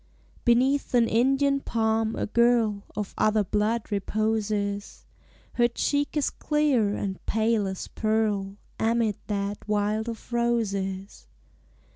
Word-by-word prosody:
Beneath 255 +3 +2
an 235 -1 +4
Indian 270 +5 +2
palm 225 -3 0
a - - -1
girl 230 -2 +2
Of 210 -2 -4
other 215 -1 +3
blood 210 +4 -1
reposes; 205 0 -2 0.5
Her 240 -1 +3
cheek 285 +5 -1
is 295 - +1
clear 275 -9 +1
and 190 -2 -4
pale 220 -2 +1
as 190 -1 -5
pearl 210 -3 -1 0.2
Amid 225 -2 +1
that 200 -1 -2
wild 210 +2 0
of 230 +1 -8
roses. 200 -5 -1
220 Hz, 115 wpm, -26 LUFS, 205-235 Hz, 0.5 s, an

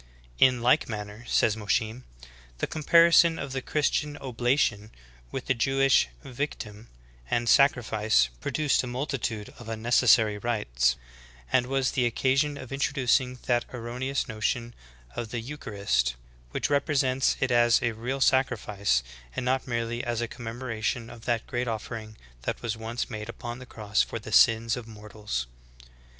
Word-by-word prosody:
"In 125 -2 +5
like 125 0 +3
manner," 105 +1 -6
says 110 - +3
Mosheim, 110 +3 -1 0.5
''the - - -1
comparison 165 +1 +5
of 140 -1 -5
the 130 0 -3
Christian 150 +1 0
oblation 120 -4 0 0.4
with 130 - -5
the 130 - +2
Jewish 135 - +3 0.2
victim 120 -5 -5 0.4
and 120 0 0
sacrifice, 110 - +4
pro - - -4
duced 150 -2 +2
a 130 - -6
multitude 125 -4 -3
of 120 -2 -9
unnecessary 110 -1 +3
rites, - - +1 0.6
and 125 -1 +3
was 135 0 +1
the 125 -2 +1
oc 115 - -4
casion 140 +2 +1
of 130 -2 -9
introducing 130 -2 +1
that 120 -1 +1
erroneous 125 +3 -3
notion 115 +1 -2 0.4
of 115 - -4
the 120 - -3
eucharist, 100 - -1 0.4
w^hich - - -2
represents 135 -2 +2
it 130 -1 0
as 120 -1 +5
a 120 - +1
real 120 +5 -4
sacrifice, 105 - +2 0.3
and - - -3
not 130 +1 0
merely 120 0 -2
as 120 -2 -2
a 120 - -1
commemoration 115 -1 -4
of 115 - -12
that 120 -2 0
great 125 0 -2
offering 110 -1 -5 0.2
that - - -4
was 115 -3 -1
once 115 +2 -4
made 105 0 -6
upon 120 +1 -6
the 130 - -11
cross 105 -3 0
for - - -3
the 105 -1 -9
sins 115 +1 +5
of 120 -2 -8
mortals. 105 - -5
120 Hz, 150 wpm, -27 LUFS, 110-130 Hz, 0.6 s, In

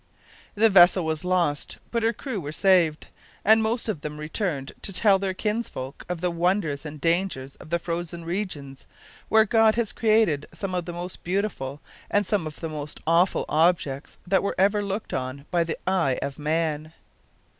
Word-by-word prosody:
The 220 +2 +5
vessel 180 -1 +7
was 160 0 -2
lost, 175 -5 0
but 235 - 0
her 225 +1 +3
crew 235 -5 -5
were 145 -1 -5
saved, 170 -3 +3 0.4
and 220 +2 +6
most 225 +2 0
of 205 -9 -2
them 150 0 -6
returned 155 -3 -3
to - - -3
tell 195 0 +4
their 190 -1 -2
kinsfolk 210 - -4
of 180 -2 -3
the 180 -1 +1
wonders 170 -4 0
and 150 - -7
the 150 +3 -3
dangers 165 -6 0
of - - -13
the 170 - +2
frozen 170 0 -4
regions, 165 -7 -5 0.4
where 220 0 +6
God 225 0 +4
has 235 -3 0
created 215 -10 +2
some 195 -2 -4
of 180 -2 -1
the 175 - -5
most 175 +1 -7
beautiful 175 -8 -2 0.3
and 205 0 +2
some 190 -5 0
of 150 - -9
the 165 - -3
most 150 -1 -6
awful 170 +4 +3
objects 155 -4 +1
that 190 +1 +2
were 200 - -2
ever 200 +2 +3
looked 200 +2 -4
on 130 +2 -4
by 175 -1 +3
the 165 -1 -4
eye 170 -9 +1
of 140 +1 -5
man. 155 0 -1
175 Hz, 185 wpm, -25 LUFS, 150-200 Hz, 0.4 s, vessel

